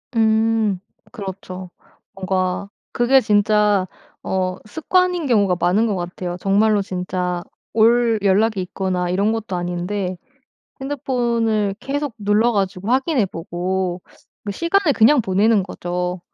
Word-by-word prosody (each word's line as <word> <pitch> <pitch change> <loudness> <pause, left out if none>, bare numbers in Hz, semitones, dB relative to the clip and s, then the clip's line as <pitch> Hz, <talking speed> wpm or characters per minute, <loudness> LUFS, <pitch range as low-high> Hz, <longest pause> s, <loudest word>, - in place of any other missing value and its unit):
음. 220 -3 +2 0.3
그렇죠. 190 -4 -7 0.4
뭔가 185 0 -2 0.2
그게 260 +2 +4
진짜 210 -2 +2 0.4
어 185 -1 -1
습관인 350 - 0
경우가 200 -6 +3
많은 195 +7 +2
것 205 - -1
같아요. 175 0 -5
정말로 205 +2 +3
진짜 180 -1 -3 0.3
올 230 0 +4
연락이 205 +1 +2
있거나 180 -1 -2
이런 200 +4 +1
것도 220 -4 -3
아닌데 180 +2 -3 0.6
핸드폰을 235 -7 0
계속 285 -2 -3
눌러 210 +3 +2
가지고 195 0 -2
확인해 260 - +2
보고 180 +1 -3 0.5
시간을 335 - +2
그냥 250 +5 +5
보내는 205 +1 +2
거죠. 180 -1 -4
205 Hz, 250 characters per minute, -20 LUFS, 185-225 Hz, 0.6 s, 그냥